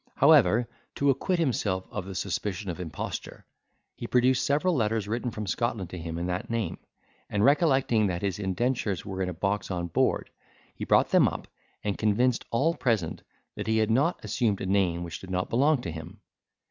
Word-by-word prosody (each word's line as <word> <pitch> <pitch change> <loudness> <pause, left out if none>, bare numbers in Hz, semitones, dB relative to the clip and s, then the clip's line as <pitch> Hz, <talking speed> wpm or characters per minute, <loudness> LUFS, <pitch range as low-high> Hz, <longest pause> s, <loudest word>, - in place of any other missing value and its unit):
However, 135 -5 +5 0.3
to 140 0 +3
acquit 175 +7 0
himself 105 - 0
of 100 -3 -4
the 95 -1 -7
suspicion 95 +1 -3
of 85 - -8
imposture, 80 -5 -6 0.5
he - - -6
produced 125 +1 +3
several 150 +7 +2
letters 110 -4 0
written 120 +3 -2
from 110 -2 -5
Scotland 100 -2 -2
to 90 - -6
him 80 0 -5
in 85 - -2
that 90 +1 -3
name, 115 -2 -2 0.5
and, 105 +1 +1
recollecting 135 -7 +3
that 90 0 -3
his 100 0 -1
indentures 105 -1 -1
were 95 -1 -4
in 90 - 0
a - - -4
box 100 +4 -1
on 85 -2 -3
board, - - +1 0.4
he - - -6
brought - - +4
them - - +6
up, - - -5 0.4
and 100 -2 -2
convinced 115 +3 +2
all 145 +8 +2
present 110 - -1 0.3
that - - -6
he 110 0 +2
had 110 0 +2
not 145 +9 +2
assumed 105 -1 0
a - - -4
name 95 -3 +1
which 85 -2 -6
did 95 - -11
not 90 0 -2
belong 140 +3 +3
to 85 - -4
him. 80 +6 -9
105 Hz, 190 wpm, -27 LUFS, 95-125 Hz, 0.5 s, them